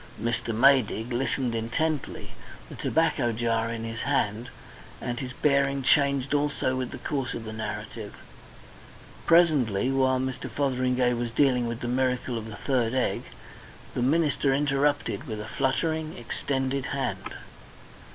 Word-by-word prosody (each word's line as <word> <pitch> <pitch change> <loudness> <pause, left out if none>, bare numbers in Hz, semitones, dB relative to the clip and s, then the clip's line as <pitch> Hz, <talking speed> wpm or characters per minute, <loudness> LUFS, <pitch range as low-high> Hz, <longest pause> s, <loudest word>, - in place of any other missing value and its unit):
Mr. 115 0 -1
Maydig 120 -1 +3
listened 130 0 0
intently, 135 +7 -2 0.4
the - - -8
tobacco 155 -7 +1
jar 115 0 0
in 115 -1 -4
his 115 0 -5
hand, 120 -4 0 0.5
and 120 -1 -3
his 130 -2 -5
bearing 140 0 +1
changed 140 0 +3
also 145 -3 +1
with 130 -1 -2
the - - -7
course 135 -4 -3
of 115 - -5
the 110 0 -6
narrative. 110 -1 -6 1.1
Presently, 135 - +4
while 130 -1 +2
Mr. 130 0 -3
Fotheringay 130 -2 +1
was 120 0 -2
dealing 125 0 +2
with 115 0 -4
the 120 - -3
miracle 125 0 0
of 110 -1 -4
the 110 - -7
third 125 -1 0
egg, 130 - 0 0.7
the - - -2
minister 145 +1 +2
interrupted 145 0 0
with 110 -3 -4
a 105 - -5
fluttering, 155 +6 -1
extended 135 +2 -2
hand. 140 -1 -3
130 Hz, 140 wpm, -27 LUFS, 115-140 Hz, 1.1 s, Presently